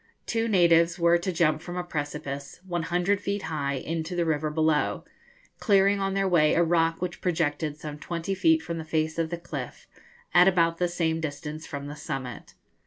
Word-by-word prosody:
Two 230 0 0
natives 170 -4 +4
were 170 0 +4
to 185 +2 -2
jump 155 -2 +2
from 175 +1 -6
a 180 - -1
precipice, 145 -3 -5
100 175 +3 0
feet 200 0 -2
high, 145 -3 -2
into 165 +5 -4
the 175 -1 +1
river 155 -1 0
below, 155 0 +1 0.5
clearing 200 -1 +4
on 195 0 -1
their 195 0 +1
way 160 -4 +4
a 175 - +4
rock 165 0 +1
which 180 -1 -4
projected 155 -3 -1
some 150 -1 -7
twenty 170 +4 -3
feet 320 - +3
from 170 -1 -4
the - - -4
face 160 +1 -1
of 165 -1 0
the 170 - -3
cliff, 170 - -7 0.5
at 180 - +7
about 165 -3 +3
the 180 - +2
same 165 -2 -1
distance 155 0 -5
from 140 -1 -6
the 145 +1 -7
summit. 135 -6 -6
165 Hz, 185 wpm, -27 LUFS, 155-180 Hz, 0.5 s, at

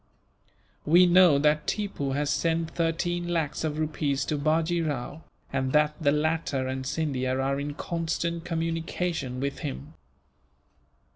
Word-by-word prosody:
We 175 +4 +6
know 175 -4 +6
that 150 +1 +2
Tippoo 195 -10 -2
has 145 +1 0
sent 165 -1 0
thirteen 175 +1 -1
lakhs 165 -4 -1
of 155 -1 -2
rupees 150 -3 -1
to 155 - -1
Bajee 160 +3 +1
Rao, 145 0 -3 0.3
and 130 -1 -1
that 150 0 +4
the 145 -2 +3
latter 150 -3 0
and 130 0 -3
Scindia 130 -4 -1
are 135 +1 0
in 145 0 -4
constant 170 +1 -2
communication 165 -4 -2
with 140 +1 -3
him. 65 +1 -6
155 Hz, 135 wpm, -27 LUFS, 140-165 Hz, 0.3 s, We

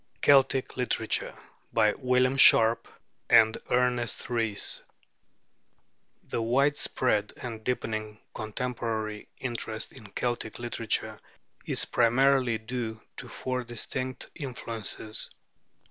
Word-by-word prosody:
CELTIC 135 -2 +4
LITERATURE 125 -1 0 0.4
BY 105 0 +4
WILLIAM 125 0 +2
SHARP 115 -3 +6 0.4
AND 110 0 +6
ERNEST 125 -1 0
RHYS 115 -4 0 1.4
The - - -3
widespread 125 -3 +1
and 115 -3 -7
deepening 110 -3 -3 0.2
contemporary 110 -2 -3
interest 115 -3 -4
in 115 -6 -12
Celtic 120 -2 -2
literature 120 -2 -2 0.5
is - - 0
primarily 125 0 +3
due 110 -1 -4 0.2
to - - -7
four 130 -1 -3
distinct 130 +2 -4
influences. 115 -5 -5
120 Hz, 90 wpm, -28 LUFS, 110-125 Hz, 1.4 s, SHARP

